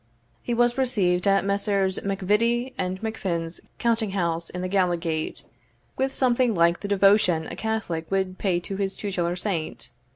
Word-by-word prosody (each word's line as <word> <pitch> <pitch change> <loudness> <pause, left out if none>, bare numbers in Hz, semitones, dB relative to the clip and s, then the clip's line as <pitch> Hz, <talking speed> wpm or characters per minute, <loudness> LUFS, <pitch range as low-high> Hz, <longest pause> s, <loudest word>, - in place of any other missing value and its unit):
He 240 - -2
was 240 +2 +2
received 195 -8 +2
at 195 0 +3
Messrs. 200 -1 +1
MacVittie 210 +6 +1
and 185 0 -3
MacFin's 175 -7 -3 0.2
counting 225 -4 0
house 170 -3 -1
in 180 - -5
the - - -1
Gallowgate, 175 -4 -1 0.5
with 265 0 -1
something 245 -3 +2
like 170 0 +3
the 205 - -5
devotion 195 -4 +4
a - - -6
Catholic 210 -8 -3
would 190 -1 -1
pay 185 -4 +1
to 195 +2 -5
his 195 -1 -2
tutelar 175 -4 -2
saint. 170 - -3
195 Hz, 155 wpm, -25 LUFS, 175-220 Hz, 0.5 s, devotion